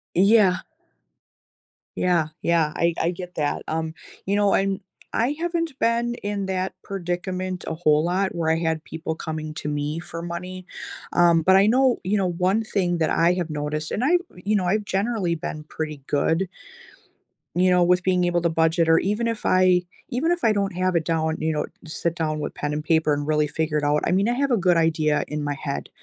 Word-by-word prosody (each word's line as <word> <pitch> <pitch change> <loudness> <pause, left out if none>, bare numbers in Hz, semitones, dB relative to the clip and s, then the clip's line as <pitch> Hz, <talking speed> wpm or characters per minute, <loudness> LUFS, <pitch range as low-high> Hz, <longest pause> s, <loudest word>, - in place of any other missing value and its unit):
Yeah. 195 -1 +5 1.3
Yeah, 175 -4 +2
yeah, 165 -3 +2
I 170 0 +2
I 170 - +1
get 180 0 -8
that, 150 -1 -1
um, 160 0 -2 0.3
you 195 - 0
know, 205 -1 +3
and 195 0 +1 0.3
I 245 +5 +1
haven't 335 -4 -2
been 235 +1 +1
in 205 -2 -3
that 190 0 -2
predicament 185 0 -3
a - - -2
whole 155 -2 +2
lot 190 +3 0
where 165 -2 +1
I 160 - +2
had 160 -1 -1
people 160 0 -5
coming 155 -1 -5
to 150 - -4
me 150 +2 -2
for 165 -1 -7
money. 180 +2 -6 0.5
Um, 170 -1 +5
but 190 +4 +5
I 195 +2 +6
know 255 +2 +3
you 195 +4 +1
know, 190 -2 +1
one 185 +5 +1
thing 185 -5 0
that 160 -2 +1
I 170 +1 +3
have 175 -2 -2
noticed 150 +1 -3
and 230 - -1
I 335 +7 +4 0.2
you 200 +4 0
know, 185 - -1
I've 210 +4 +1
generally 195 -3 -1
been 155 -1 -5
pretty 150 -3 -5
good 165 +5 +1 1.0
you 185 +1 +3
know, 180 -1 +4
with 180 +1 +3
being 180 -1 +2
able 175 0 +1
to 170 - +2
budget 165 +1 +2
or 165 - +6
even 210 +4 0
if 230 -2 -3
I 185 -1 +4 0.3
even 300 +8 0
if 350 -1 -1
I 225 - +5
don't 200 -2 -1
have 185 0 0
it 165 -2 +1
down, 160 -1 0
you 160 - 0
know, 150 - -1 0.2
sit 165 +1 -2
down 155 -2 -1
with 150 - -4
pen 150 0 -3
and 150 0 -3
paper 160 -1 +2
and 145 0 -2
really 150 -1 +2
figure 155 +1 -1
it 150 - -1
out, 145 +1 +2
I - - +1
mean, 195 +3 +2
I - - +2
have 275 +2 0
a 240 - +4
good 180 -3 +3
idea 155 -2 +2
in 150 0 -4
my 145 0 -2
head 140 -2 -4
175 Hz, 210 wpm, -24 LUFS, 160-195 Hz, 1.3 s, I